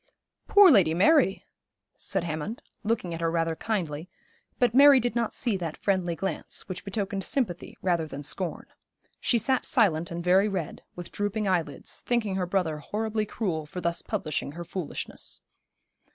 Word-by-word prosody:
'Poor 405 -4 +8
Lady 175 - +5
Mary!' 205 - +4 0.5
said 195 -3 -2
Hammond, 160 +7 -4 0.2
looking 210 -5 -1
at 165 - -5
her 165 - +1
very 165 -1 0
kindly: 170 -6 -3 0.5
but 245 -2 +2
Mary 280 +1 +8
did 245 -1 -1
not 235 -2 0
see 235 -5 -1
that 170 -4 -4
friendly 185 -4 0
glance, 195 +3 -4
which 185 - -6
betokened 200 -1 -3
sympathy 190 -6 -2
rather 170 -4 +1
than 145 -1 -7
scorn. 155 +6 -2 0.5
She 240 - +2
sat 260 +3 +1
silent 175 - +2
and 170 0 -5
very 185 +3 +4
red, 185 -7 -4
with 175 -1 -8
drooping 205 +1 -1
eyelids, 165 -7 -1
thinking 235 -5 0
her 185 -1 -1
brother 175 -5 0
horribly 215 +6 -2
cruel 165 -9 -2
for 180 - -6
thus 170 -1 -1
publishing 150 -2 -3
her 170 +2 -7
foolishness. 180 -2 -6
185 Hz, 160 wpm, -27 LUFS, 165-215 Hz, 0.5 s, Poor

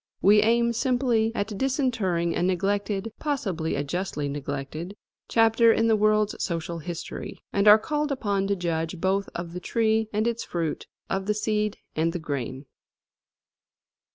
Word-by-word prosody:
We 210 +2 +6
aim 235 +2 +3
simply 240 -2 +1
at 205 0 -2
disinterring 225 - 0
a - - -1
neglected, 195 +3 0
possibly 195 - -2
a 145 - -1
justly 150 -1 -3
neglected, 145 +6 -5 0.3
chapter 225 0 +5
in 225 - +2
the 225 -1 +4
world's 215 0 +2
social 170 -1 -3
history, 170 +1 -6 0.2
and 200 +1 +2
are 210 +1 +10
called 295 +6 -2
upon 200 -7 0
to 200 - +1
judge 165 -1 -2
both 195 +2 0
of 170 0 -5
the 180 - -4
tree 220 +1 +1
and 215 +1 0
its 235 0 -1
fruit, 165 -3 -3 0.2
of 190 0 -2
the 210 - +1
seed 210 0 0 0.2
and 165 +1 +1
the - - -1
grain. 140 -3 -4
200 Hz, 155 wpm, -26 LUFS, 170-225 Hz, 0.3 s, are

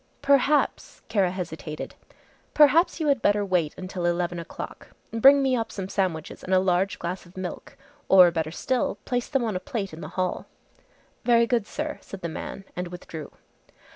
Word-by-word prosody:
"Perhaps" 280 +1 +2
Kara 200 -5 +2
hesitated, 160 -4 -6 0.6
"perhaps 300 +4 +5
you 315 - -1
had 280 -5 +2
better 205 -1 +2
wait 175 -5 0
until 185 -1 -3
eleven 175 0 -1
o'clock. 170 - -8 0.3
Bring 275 +5 +6
me 265 -1 +2
up 230 -2 -2
some 190 -2 -5
sandwiches 185 -5 -2
and 185 - +1
a - - +6
large 185 +1 +1
glass 180 +1 -5
of 175 - -18
milk. 185 -1 -6 0.3
Or 180 -2 +8
better 160 -2 -1
still, 250 +9 -1
place 245 -1 -1
them 270 -4 +1
on 220 -4 -1
a - - 0
plate 195 -3 -4
in 160 - -8
the - - -6
hall." 185 -1 -1 0.8
"Very 235 -1 +5
good, 230 -3 0
sir," 300 0 -4
said 195 - -10
the 170 - -3
man 195 +4 -6
and 180 0 -3
withdrew. 170 -3 -8
190 Hz, 175 wpm, -26 LUFS, 175-240 Hz, 0.8 s, Or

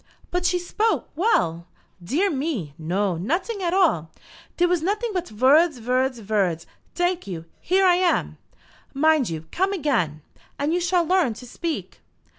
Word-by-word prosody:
"But 360 0 +1
she 360 - +2
spoke 425 +5 -1
well." 175 - +1 0.4
"Dear 320 - +1
me, 265 - -3
no; 180 +3 -1
noting 360 - -2
at 345 -2 0
all. 325 - +2 0.5
Dere 355 - +4
was 350 -2 +1
noting 425 +7 -1
but 360 -2 -2
vords, 275 +7 +4
vords, 255 +2 0
vords. 195 -6 0 0.3
Tank 355 - 0
you; 165 -4 -6
here 380 +2 +2
I 355 -1 +5
am. 360 -1 0 0.6
Mind 310 - +3
you 160 -1 -5
come 380 +2 0
again, 225 - -1 0.3
and 290 +3 0
you 355 - +2
shall 350 0 +2
learn 340 -9 +2
to 250 - -11
speak." 325 +6 -5
310 Hz, 155 wpm, -23 LUFS, -, 0.6 s, I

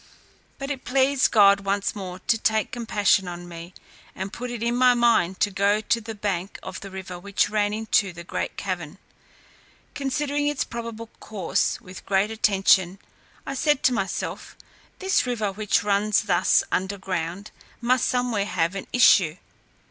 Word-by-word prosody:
But 275 +1 -5
it 270 -2 -5
pleased 270 +1 +2
God 200 -2 +6
once 200 +1 -1
more 185 -3 -6
to 235 - +3
take 220 -1 0
compassion 210 -5 +1
on 175 0 -7
me, 170 +1 -10 0.4
and 190 +2 -5
put 250 +1 -5
it 240 -2 -5
in 235 +1 0
my 250 0 +5
mind 225 -7 +2
to 205 - +2
go 200 +2 +2
to 230 +2 0
the 225 0 -7
bank 200 -2 -3
of 185 - -7
the 195 - -9
river 185 -2 -7
which 200 +2 0
ran 205 -1 +1
into 215 -2 +1
the 170 0 -10
great - - -4
cavern. 180 -3 -4 1.0
Considering 290 +1 -1
its 295 -3 0
probable 230 -1 -7
course 195 -6 -1
with 185 0 -11
great 195 +2 +2
attention, 195 -4 +3 0.5
I - - -4
said 295 +1 +1
to 255 - +4
myself, 195 -4 -4 0.4
"This 380 -8 +1
river, 220 -5 -1
which 205 0 0
runs 205 +1 +2
thus 185 -4 +3
under 190 +2 -1
ground, 185 +1 -4 0.3
must 245 +1 +2
somewhere 245 -5 0
have 175 -3 0
an 195 - -6
issue. 190 -9 +5
205 Hz, 165 wpm, -24 LUFS, 190-235 Hz, 1.0 s, God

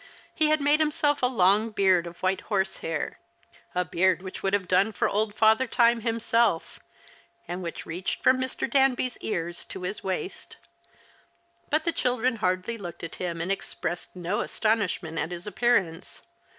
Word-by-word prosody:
He 310 - +3
had 310 0 +3
made 290 +2 +4
himself 300 -1 +1
a 250 - +4
long 215 -1 +3
beard 190 -5 +3
of 170 +2 -12
white 190 +1 +1
horsehair 190 -6 -2 0.3
— - - -29
a 180 0 +1
beard 180 +1 +1
which 185 - -7
would 195 - 0
have 200 -3 +1
done 195 +4 +3
for - - 0
old 210 0 0
Father 220 +4 +4
Time 235 -1 +3
himself 230 -4 +1 0.3
— - - -31
and 175 +2 -4
which 170 -2 -6
reached 175 +3 -4
from 255 0 +5
Mr. 260 0 -2
Danby's 260 -1 +2
ears 170 -4 -3
to 190 - -8
his 195 +4 -4
waist. 190 - -5 1.1
But 310 0 +2
the 335 - +1
children 250 -2 0
hardly 185 +3 -1
looked 175 -4 -8
at 165 - -6
him 170 -2 -3
and 180 +3 -1
expressed 175 -3 -4
no 180 +3 -2
astonishment 200 -7 -1
at 160 - -1
his 175 0 -7
appearance. 210 -6 0
200 Hz, 170 wpm, -26 LUFS, 180-240 Hz, 1.1 s, from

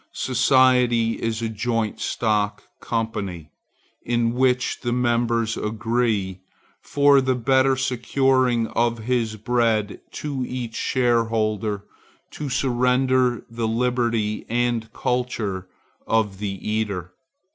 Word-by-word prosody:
Society 125 -2 +3
is 115 0 -2
a - - 0
joint 110 0 -2
stock 105 -3 -1 0.2
company, 100 -8 -3 0.5
in 120 -1 0
which 125 0 +1
the 120 - -2
members 120 -2 +1
agree, 110 -3 -1 0.4
for 140 -1 +4
the 130 -1 +1
better 130 +2 +3
securing 130 -1 +1
of 120 0 0
his 115 -2 0
bread 110 -2 0
to 140 -4 -4
each 120 -3 -5
shareholder, 110 -5 0 0.5
to 150 -2 -5
surrender 125 -1 +1
the 115 -1 -3
liberty 115 -2 0
and 120 -1 0
culture 120 -7 -2 0.4
of 105 -4 0
the 100 -2 -3
eater. 100 -5 -2
115 Hz, 105 wpm, -23 LUFS, 110-125 Hz, 0.5 s, for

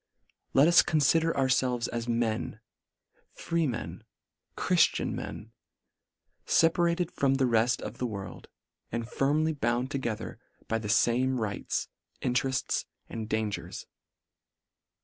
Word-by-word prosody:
Let 140 +3 +7
us 170 0 +7
confider 160 +2 +3
ourfelves 130 -3 +1
as 120 0 -4
men 115 -2 -1 0.4
— - - -41
Freemen 160 -8 -2 0.3
— - - -50
Chriftian - - +2
men 110 +1 -7 0.5
— - - -48
feparated 170 +1 +3
from 135 -1 +1
the 135 -1 +2
reft 120 0 +2
of - - -7
the 125 - 0
world, 100 -5 -7 0.4
and 115 0 -3
firmly 150 +5 +1
bound 125 -1 -1
together 115 -5 -4 0.3
by 115 - 0
the 105 -2 -5
fame 125 +3 +2
rights, 105 -2 -2 0.3
interefts, 125 +1 0 0.2
and 110 -1 -5
dangers. 105 -6 -3
125 Hz, 120 wpm, -29 LUFS, 115-140 Hz, 0.5 s, Let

